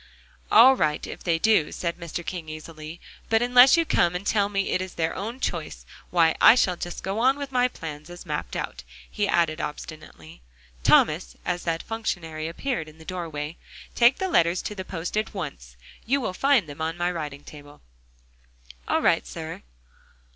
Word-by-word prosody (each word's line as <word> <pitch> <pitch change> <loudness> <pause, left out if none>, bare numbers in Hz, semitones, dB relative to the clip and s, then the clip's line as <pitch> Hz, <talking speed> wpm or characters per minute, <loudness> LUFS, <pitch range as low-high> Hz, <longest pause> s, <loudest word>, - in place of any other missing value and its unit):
"All 260 +2 +8
right 150 -10 0
if - - -9
they 170 -2 +1
do," 210 -3 +3
said 170 0 -4
Mr. 170 0 -6
King 170 -4 -5
easily, 155 +1 -9 0.3
"but 225 +1 +3
unless 250 +4 +7
you 335 - +2
come 175 - +2
and 180 +3 -4
tell 205 -2 +2
me 195 -1 -1
it 185 - +1
is 185 -1 -6
their 160 -1 -1
own 225 +6 -5
choice, - - -4 0.2
why, 165 -2 +3
I - - +9
shall 185 -7 +2
just 175 0 -6
go 195 +3 -2
on 260 +4 +3
with 280 -1 -6
my 250 -1 +3
plans 155 -8 -8
as 175 0 -10
mapped - - -4
out," - - -4 0.3
he 205 -1 0
added 165 -3 +1
obstinately. 150 - -8 0.4
"Thomas," - - +3
as 180 0 -2
that 165 -1 -1
functionary 165 -8 -4
appeared 165 - -3
in 155 - -17
the 160 - -14
doorway, 165 -3 -5 0.4
"take 240 +2 +5
the 380 - -1
letters 175 - +2
to - - -4
the 190 -2 -6
post 180 -1 -5
at 215 0 -2
once; 65 - -7 0.3
you 275 +4 +2
will 220 -8 -3
find 270 - +3
them 145 +2 -9
on 165 +1 -2
my 175 +1 0
writing 150 -4 -6
table." 145 -1 -13 1.1
"All - - +1
right, - - +2
sir." - - -7
175 Hz, 185 wpm, -25 LUFS, 155-220 Hz, 1.1 s, I